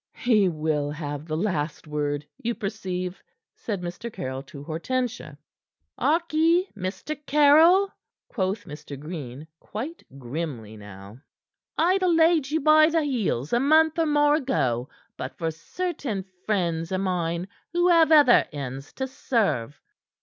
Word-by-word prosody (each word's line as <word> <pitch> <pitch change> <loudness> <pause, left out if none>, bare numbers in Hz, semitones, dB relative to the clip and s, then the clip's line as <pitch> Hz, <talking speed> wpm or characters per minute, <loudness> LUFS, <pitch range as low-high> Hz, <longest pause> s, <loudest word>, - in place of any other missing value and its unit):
"He 215 -6 +3
will 155 -2 -1
have 145 0 -5
the 155 -1 -2
last 160 -6 -2
word, 150 -1 -2 0.2
you 235 -1 -1
perceive," 190 -4 -4 0.3
said 205 -5 -4
Mr. 180 +7 -6
Caryll 130 -7 -5
to 140 +1 -11
Hortensia. 220 - -3 0.6
"Harkee, 330 +4 +2
Mr. 200 +10 -4
Caryll," 320 +7 +5 0.3
quoth 195 0 -2
Mr. 150 -3 -9
Green, 150 -3 -7
quite 270 +11 -6 0.2
grimly 125 -5 -5
now. 100 +1 -12 0.6
"I'd 365 +4 +3
ha' 370 - +2
laid 325 -4 +4
you 315 +1 0
by 310 +1 +6
the 325 -1 +1
heels 215 - -1
a 240 - +4
month 315 +4 +4
or 325 - +2
more 295 0 +4
ago, 130 - -1 0.3
but - - -6
for 165 -1 -1
certain 250 - -4 0.2
friends 170 -5 0
o' 190 - 0
mine 180 -2 -1 0.2
who 350 +1 +2
have 330 -2 +5
other 290 -6 +6
ends 135 -2 -6
to 265 - -3
serve." 210 - -1
195 Hz, 135 wpm, -25 LUFS, -, 0.6 s, by